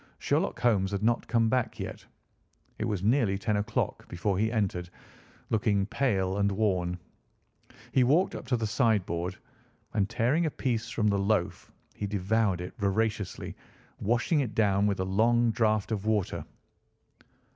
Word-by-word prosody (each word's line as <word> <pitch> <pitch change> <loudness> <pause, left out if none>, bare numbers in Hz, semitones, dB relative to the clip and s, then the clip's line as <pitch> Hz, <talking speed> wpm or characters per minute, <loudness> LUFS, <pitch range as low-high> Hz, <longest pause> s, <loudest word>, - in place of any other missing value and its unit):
Sherlock - - 0
Holmes 105 -6 +3
had 100 +1 -3
not 120 +1 +1
come 115 -1 +2
back 125 +1 0
yet. - - -6 0.8
It 110 - -1
was 105 -5 -2
nearly 110 -3 +2
ten 105 +2 -1
o'clock 105 - -2
before 95 +2 -1
he 110 +1 +1
entered, 95 -6 -1 0.6
looking 105 -3 +2
pale 100 -5 0
and 100 0 +2
worn. 90 -4 0 0.9
He 130 - +4
walked 155 +9 +3
up - - -7
to 125 0 +1
the 115 - -2
sideboard, 100 -6 0 0.6
and 100 -2 +1
tearing 135 +9 +1
a - - +1
piece 120 -5 -2
from 115 -1 -1
the 100 -1 +1
loaf 100 -2 -1 0.2
he 105 - -4
devoured 100 -1 +1
it 90 - -6
voraciously, 105 0 -1 0.4
washing 120 - +1
it 125 -6 -2
down 100 -2 +3
with 100 -2 0
a - - -1
long 115 +5 +3
draught 110 -2 +1
of 105 -3 -1
water. 105 -4 0
105 Hz, 155 wpm, -29 LUFS, 95-115 Hz, 0.9 s, He